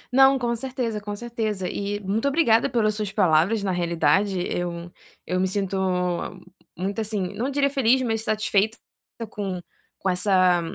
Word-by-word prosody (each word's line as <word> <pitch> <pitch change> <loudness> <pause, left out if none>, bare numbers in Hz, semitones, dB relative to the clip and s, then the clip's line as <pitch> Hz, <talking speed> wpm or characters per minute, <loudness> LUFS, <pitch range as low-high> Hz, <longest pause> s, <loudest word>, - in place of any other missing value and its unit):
Não, 270 0 +7
com 240 -2 -1
certeza, 235 -3 -3
com 205 0 -5
certeza. 215 -4 -3
E 205 +2 -3
muito 210 +7 -1
obrigada 270 -6 +3
pelas 215 -3 +1
suas 210 -2 -3
palavras. 195 +2 +3
Na 195 - 0
realidade, 175 +2 +1
eu 175 0 -4 0.3
eu 185 0 -1
me 190 - +2
sinto 195 0 -2 1.0
muito 195 +4 -2
assim, 210 -4 -2
não 250 +4 -2
diria 280 0 +2
feliz, 265 -2 +3
mas 225 -2 -1
satisfeita 215 0 +1 0.5
com 195 -3 -4 0.4
com 195 - -1
essa 185 -2 +3
205 Hz, 150 wpm, -24 LUFS, 185-230 Hz, 1.0 s, Não